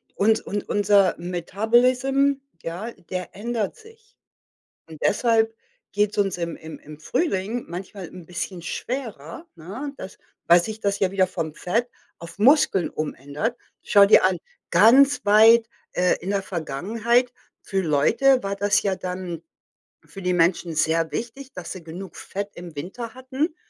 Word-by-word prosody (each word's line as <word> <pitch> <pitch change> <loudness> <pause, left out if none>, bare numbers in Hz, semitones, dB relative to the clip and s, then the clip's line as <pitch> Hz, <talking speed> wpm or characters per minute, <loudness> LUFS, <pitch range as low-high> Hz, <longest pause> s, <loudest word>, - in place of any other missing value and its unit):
und 220 +2 +3
und 205 0 -5
unser 205 -2 +3
Metabolism, 240 +10 +2 0.3
ja, 180 +8 -5 0.2
der 185 -1 -5
ändert 220 -1 -3
sich. 445 +1 -19 0.7
Und 160 -2 -12
deshalb 225 0 +2 0.4
geht's 205 +1 0
uns 195 -3 +1
im 170 -1 -4
im 160 0 -10
im 150 0 -12
Frühling 220 - -1
manchmal 185 +1 -7
'n 180 -3 -12
bisschen 180 +1 -5
schwerer, 225 - -6
ne, 205 - -7
das 190 - -9 0.3
weil 170 0 +6
sich 220 +2 -6
das 200 -1 0
ja 190 - +1
wieder 190 -1 +2
vom 165 -4 -4
Fett 230 +9 -1 0.3
auf 170 +3 -11
Muskeln 220 - +4
umändert. 155 - -4 0.3
Schau 200 -1 +6
dir 200 -1 +6
an, 185 -1 +1 0.3
ganz 255 +9 +5
weit, 220 +3 +6 0.3
äh, 180 0 +2
in 185 - -4
der 200 -1 0
Vergangenheit 215 - 0 0.3
für 195 -1 -1
Leute 225 - +3
war 200 0 -3
das 205 +1 +2
ja 195 -2 0
dann 180 -2 -5 0.6
für 195 - -11
die 180 0 +1
Menschen 170 -1 +1
sehr 160 +1 +1
wichtig, 260 +3 -6
dass 180 -2 -7
sie 185 - -9
genug 175 +2 -9
Fett 200 +1 -5
im 175 -2 -10
Winter 225 +10 -6
hatten, 265 +5 -3
200 Hz, 150 wpm, -23 LUFS, 175-235 Hz, 0.7 s, weil